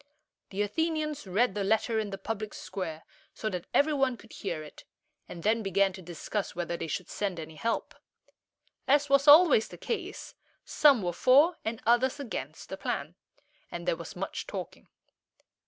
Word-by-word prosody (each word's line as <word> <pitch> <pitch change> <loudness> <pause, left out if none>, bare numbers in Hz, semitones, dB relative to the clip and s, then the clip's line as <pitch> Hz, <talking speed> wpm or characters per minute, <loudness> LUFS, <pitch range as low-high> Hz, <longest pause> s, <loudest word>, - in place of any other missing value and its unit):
The 200 +1 -1
Athenians 305 +2 -2
read 200 +4 +2
the 205 0 -2
letter 220 +2 +1
in 215 -2 -2
the 195 - -5
public 215 +1 -5
square, 170 -5 -5 0.3
so 215 - -3
that 180 -2 -5
every 305 +2 +3
one 270 -3 +1
could 225 - -16
hear 170 -6 -4
it, 150 - -13 0.5
and 170 - -8
then 225 +2 +2
began 195 -1 +2
to 190 - -9
discuss 175 +4 -4
whether 175 0 -2
they 165 - -4
should 170 +3 -3
send 195 -4 -3
any 160 0 -7
help. 230 +9 -2 0.9
As 290 +1 +3
was 275 +1 +4
always 295 -6 +8
the - - -11
case, 405 -3 -5 0.3
some 280 -8 +5
were 175 -1 -1
for, 285 - +5
and 225 0 -4
others 245 +4 +3
against, 275 -5 -6
the - - -5
plan, - - -3 0.6
and - - -7
there - - +2
was - - -9
much - - -4
talking. - - -7
220 Hz, 170 wpm, -29 LUFS, 190-275 Hz, 0.9 s, always